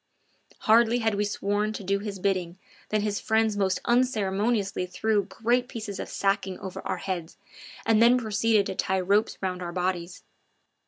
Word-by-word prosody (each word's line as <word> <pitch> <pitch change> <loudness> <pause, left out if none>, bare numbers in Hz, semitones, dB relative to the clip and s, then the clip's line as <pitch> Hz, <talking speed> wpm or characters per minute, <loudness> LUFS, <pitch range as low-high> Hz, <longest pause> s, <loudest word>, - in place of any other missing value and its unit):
Hardly 230 +2 +4
had 220 -2 +1
we 205 +1 0
sworn 205 +1 -1
to 205 - -6
do 200 +1 0
his 205 -1 -5
bidding 185 -2 -1 0.3
than 215 0 +1
his 205 -1 -1
friends 220 -1 +1
most 190 -2 +1
unceremoniously 210 -5 +1
threw 205 +2 0
great 240 +5 0
pieces 215 -5 -6
of - - -5
sacking 195 -1 0
over 190 -2 -7
our - - -1
heads, 180 -4 -5 0.5
and 225 -1 +4
then 240 +2 +6
proceeded 220 -2 +2
to - - -3
tie 190 0 0
ropes 200 +4 +1
round 185 -1 -2
our 175 -1 -4
bodies. 180 0 -3
205 Hz, 165 wpm, -26 LUFS, 190-220 Hz, 0.5 s, then